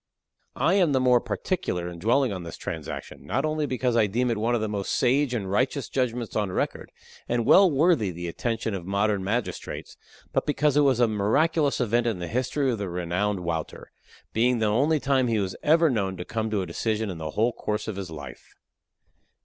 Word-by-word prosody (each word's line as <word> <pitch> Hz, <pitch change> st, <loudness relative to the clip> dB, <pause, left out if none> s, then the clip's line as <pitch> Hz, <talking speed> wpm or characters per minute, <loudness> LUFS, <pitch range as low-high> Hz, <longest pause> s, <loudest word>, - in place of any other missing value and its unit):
I 180 Hz, -, +2 dB
am 180 Hz, -7 st, +3 dB
the 130 Hz, -, +3 dB
more 125 Hz, -2 st, +4 dB
particular 90 Hz, -, -2 dB
in 85 Hz, -1 st, -8 dB
dwelling 120 Hz, +4 st, +2 dB
on 95 Hz, -, -5 dB
this 85 Hz, -1 st, -8 dB
transaction, 80 Hz, -2 st, -6 dB
not 130 Hz, +9 st, -1 dB
only 155 Hz, -1 st, -1 dB
because 125 Hz, -2 st, 0 dB
I 110 Hz, -3 st, +4 dB
deem 120 Hz, +5 st, 0 dB
it 115 Hz, -, -1 dB
one 115 Hz, +3 st, +1 dB
of 115 Hz, -, -1 dB
the 110 Hz, -, -1 dB
most 100 Hz, -2 st, -3 dB
sage 135 Hz, +2 st, +2 dB
and 100 Hz, -5 st, -3 dB
righteous 130 Hz, +7 st, 0 dB
judgments 125 Hz, -3 st, -2 dB
on 105 Hz, -3 st, 0 dB
record, -, -, -3 dB, 0.4 s
and 120 Hz, -1 st, 0 dB
well 190 Hz, -, +7 dB
worthy 150 Hz, -, +3 dB
the 85 Hz, 0 st, -5 dB
attention 110 Hz, +5 st, -2 dB
of 95 Hz, -3 st, -4 dB
modern 100 Hz, +1 st, 0 dB
magistrates, 110 Hz, +4 st, -4 dB, 0.4 s
but -, -, 0 dB
because 150 Hz, -1 st, +2 dB
it 150 Hz, -, +5 dB
was 135 Hz, -4 st, +3 dB
a 120 Hz, -, +5 dB
miraculous 140 Hz, +9 st, +1 dB
event 120 Hz, 0 st, +1 dB
in 110 Hz, -5 st, 0 dB
the 90 Hz, -1 st, -5 dB
history 130 Hz, -, 0 dB
of 115 Hz, -, -3 dB
the 100 Hz, -2 st, -3 dB
renowned 90 Hz, +3 st, -1 dB
Wouter 85 Hz, -2 st, -4 dB, 0.4 s
being 120 Hz, +2 st, +2 dB
the 110 Hz, -, +1 dB
only 140 Hz, +9 st, +2 dB
time 135 Hz, -2 st, +2 dB
he 115 Hz, -2 st, +1 dB
was 95 Hz, -2 st, -2 dB
ever 165 Hz, +2 st, +4 dB
known 100 Hz, -8 st, -1 dB
to 90 Hz, -, -6 dB
come 110 Hz, -1 st, -2 dB
to 105 Hz, -3 st, 0 dB
a -, -, -4 dB
decision 105 Hz, +4 st, -2 dB
in 85 Hz, -, -7 dB
the 80 Hz, -1 st, -4 dB
whole 115 Hz, +3 st, +2 dB
course 105 Hz, -1 st, -3 dB
of 110 Hz, -, -3 dB
his 95 Hz, -3 st, -5 dB
life. 75 Hz, -3 st, -10 dB
115 Hz, 210 wpm, -26 LUFS, 100-130 Hz, 0.4 s, well